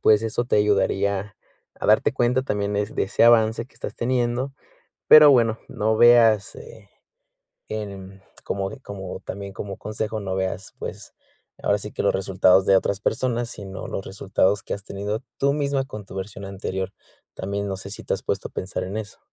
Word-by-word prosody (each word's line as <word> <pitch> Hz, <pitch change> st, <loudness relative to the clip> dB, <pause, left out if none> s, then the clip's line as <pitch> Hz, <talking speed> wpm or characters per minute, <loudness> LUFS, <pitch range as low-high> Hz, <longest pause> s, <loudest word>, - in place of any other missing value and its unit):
pues 110 Hz, 0 st, +5 dB
eso 115 Hz, +2 st, -1 dB
te 120 Hz, -, +1 dB
ayudaría 100 Hz, 0 st, +1 dB, 0.4 s
a -, -, -2 dB
darte 110 Hz, +6 st, +4 dB
cuenta 125 Hz, +1 st, +1 dB
también 105 Hz, -5 st, -2 dB
es 105 Hz, +1 st, -2 dB
de -, -, +2 dB
ese 95 Hz, -, 0 dB
avance 115 Hz, -1 st, +5 dB
que -, -, -28 dB
estás -, -, -6 dB
teniendo. 125 Hz, +2 st, -1 dB, 0.6 s
Pero 150 Hz, -1 st, +10 dB
bueno, 115 Hz, -4 st, +4 dB
no 110 Hz, +1 st, 0 dB
veas, 115 Hz, -4 st, +5 dB
eh, 465 Hz, 0 st, -13 dB, 0.8 s
en 100 Hz, -2 st, -7 dB, 0.2 s
como 95 Hz, -1 st, -2 dB
de 135 Hz, -, -10 dB
como 95 Hz, -5 st, -7 dB
también, 100 Hz, 0 st, -6 dB
como 100 Hz, 0 st, -6 dB
consejo, 110 Hz, +1 st, -4 dB
no 95 Hz, -1 st, -3 dB
veas, 95 Hz, 0 st, -3 dB
pues, -, -, -7 dB, 0.5 s
ahora -, -, +2 dB
sí -, -, -6 dB
que -, -, -3 dB
los -, -, +3 dB
resultados 95 Hz, 0 st, +3 dB
de 95 Hz, -, +6 dB
otras 100 Hz, +1 st, 0 dB
personas, 120 Hz, +2 st, -1 dB
sino 95 Hz, -2 st, -7 dB
los 95 Hz, -, -4 dB
resultados 95 Hz, +1 st, 0 dB
que -, -, -3 dB
has 100 Hz, -1 st, -9 dB
tenido 105 Hz, +4 st, -4 dB, 0.2 s
tú 140 Hz, 0 st, +2 dB
misma 140 Hz, -2 st, 0 dB
con 105 Hz, -5 st, -8 dB
tu -, -, -11 dB
versión 100 Hz, +1 st, -6 dB
anterior, 95 Hz, -1 st, -4 dB, 0.4 s
también 100 Hz, +1 st, -3 dB
no 95 Hz, -, -3 dB
sé 95 Hz, +1 st, -9 dB
si 105 Hz, -, -7 dB
te -, -, 0 dB
has -, -, -6 dB
puesto -, -, -2 dB
a -, -, -26 dB
pensar 95 Hz, 0 st, -4 dB
en 95 Hz, +3 st, -5 dB
eso. 110 Hz, -2 st, -6 dB
105 Hz, 190 wpm, -23 LUFS, 95-115 Hz, 0.8 s, Pero